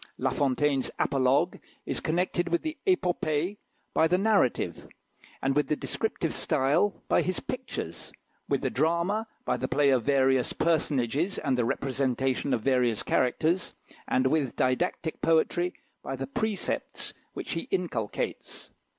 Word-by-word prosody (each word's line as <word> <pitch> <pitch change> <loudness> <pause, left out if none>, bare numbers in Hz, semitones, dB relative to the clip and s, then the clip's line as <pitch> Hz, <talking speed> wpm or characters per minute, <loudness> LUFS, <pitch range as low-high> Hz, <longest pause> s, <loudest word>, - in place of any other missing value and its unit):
La 130 0 0
Fontaine's 140 0 +1
apologue 135 0 +2 0.3
is - - -1
connected 175 +1 0
with 170 - 0
the 315 0 -3
épopée 180 - +1 0.4
by 160 - +4
the 180 +2 +3
narrative, 200 - +1 0.7
with 150 +1 +2
the 150 - +1
descriptive 170 -1 -2
style 155 +7 +1
by - - +3
his 185 -1 -1
pictures, - - -6 0.4
with - - +1
the - - -1
drama 170 - +1 0.2
by - - +1
the - - -2
play 145 -1 +3
of 130 -2 +3
various 135 -2 +3
personages, 155 - +1
and 135 -4 0
the 120 -2 +1
representation 135 +1 0
of 120 -3 +1
various 125 -5 +2
characters, 160 +8 +1 0.3
and 130 - +2
with 140 -2 +1
didactic 130 +5 0
poetry 170 +2 +2 0.3
by 135 - -4
the 135 +1 -4
precepts 200 +8 -2 0.2
which - - -5
he 165 - -3
inculcates. 165 - -3
150 Hz, 135 wpm, -28 LUFS, 130-175 Hz, 0.7 s, by